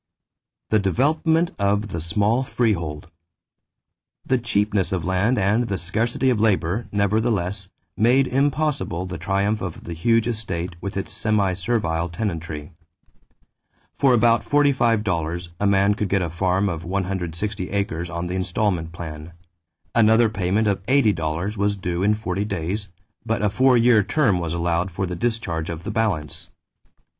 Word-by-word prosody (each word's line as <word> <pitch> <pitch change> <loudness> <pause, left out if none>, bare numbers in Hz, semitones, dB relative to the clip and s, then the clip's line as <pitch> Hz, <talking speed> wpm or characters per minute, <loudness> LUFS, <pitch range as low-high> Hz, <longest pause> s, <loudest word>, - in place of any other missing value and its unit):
=The 110 - +4
Development 155 - +1
of 100 +2 +1
the 85 -4 -4
Small 105 +9 +1
Freehold.= 85 - -1 1.2
The 130 -1 +1
cheapness 105 -4 0
of 90 -4 -2
land 95 +7 +1
and 105 +5 +2
the 100 - -2
scarcity 115 +9 0
of 110 -4 0
labor, 105 0 +1
nevertheless, 100 -2 0 0.3
made 125 +5 +4
impossible 135 - 0
the 90 -2 -6
triumph 100 +4 0
of 90 -3 -6
the 85 - -6
huge 115 +7 +2
estate 95 -7 -3
with 100 0 -5
its 95 - -4
semi 100 -1 +1
servile 85 -4 -1
tenantry. 85 -5 -4 1.3
For 135 -3 +5
about 115 0 +3
$45 105 - +1
a 100 - +2
man 100 +1 +4
could 105 -2 -2
get 95 -1 +1
a 85 - -3
farm 95 +3 +1
of 85 -3 -3
160 95 +1 -2
acres 90 -4 -2
on 85 +1 -4
the 90 - -4
installment 95 -2 -1
plan; 80 -1 -8 0.6
another 110 0 +5
payment 100 +2 0
of 100 -1 0
$80 100 - +1
was 100 +1 +1
due 90 -2 -3
in 105 +2 +3
forty 100 -2 -2
days; 100 0 -3 0.3
but 115 -1 -1
a 105 - +2
four 130 +1 +4
year 115 -2 +5
term 100 -2 +1
was 85 -1 -3
allowed 85 +2 0
for 95 +2 -3
the 90 -1 -4
discharge 90 -6 -2
of 85 0 -5
the - - -4
balance. 95 -10 -2
100 Hz, 150 wpm, -23 LUFS, 85-110 Hz, 1.3 s, For